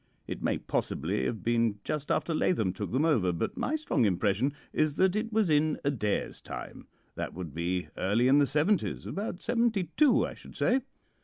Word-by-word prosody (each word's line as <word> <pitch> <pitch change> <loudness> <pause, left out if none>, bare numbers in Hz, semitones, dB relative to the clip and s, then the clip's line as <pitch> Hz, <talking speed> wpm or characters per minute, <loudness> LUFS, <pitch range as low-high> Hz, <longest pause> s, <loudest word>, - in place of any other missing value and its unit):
It - - -6
may - - +1
possibly 65 - -2
have 110 - -3
been 115 -2 +2
just 150 -1 -3
after 165 - 0
Lathom 110 - +1
took 100 +1 -5
them 135 +5 +2
over, 115 - +3
but 85 - -2
my 300 - -1
strong 305 - 0
impression 105 +6 +2 0.2
is 155 -2 +1
that 190 0 +3
it 220 +2 -1
was 215 -6 +2
in 150 +1 +2
Adair's 115 -8 -1
time. - - -8 0.3
That - - -5
would 85 -5 -6
be 90 +3 -2
early 105 +7 +2
in 140 +2 +6
the 145 - +4
seventies 155 +9 +1
about 200 -2 -4
seventy 230 -7 +1
two, 290 -3 +5
I - - -6
should - - -14
say. 260 +2 +2
145 Hz, 185 wpm, -29 LUFS, -, 0.3 s, in